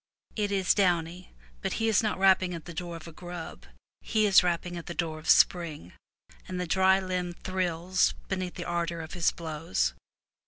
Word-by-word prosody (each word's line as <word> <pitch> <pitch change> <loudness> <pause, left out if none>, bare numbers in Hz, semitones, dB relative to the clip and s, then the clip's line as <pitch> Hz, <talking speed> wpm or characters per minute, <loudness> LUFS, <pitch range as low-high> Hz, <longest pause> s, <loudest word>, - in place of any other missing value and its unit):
It 205 -2 -1
is 190 -2 +3
downy, 180 -2 0 0.3
but - - -2
he 225 - 0
is 220 -3 +4
not 215 -2 -1
rapping 190 -2 +4
at 165 - -9
the 170 - -8
door 170 0 -5
of 165 0 -10
a - - -8
grub; 175 0 -8 0.3
he 215 -1 +1
is 200 -2 +7
rapping 175 0 -1
at 170 - -7
the 170 - -5
door 160 -2 -2
of 155 - -7
spring, 160 - +3 0.5
and 185 -1 -4
the 180 - -1
dry 190 +2 +4
limb 180 -2 -3
thrills 185 0 0
beneath 185 -2 -3
the - - -5
ardor 170 -1 -2
of 160 - -9
his 175 -2 +2
blows. 150 - -2
175 Hz, 190 wpm, -28 LUFS, 165-185 Hz, 0.5 s, is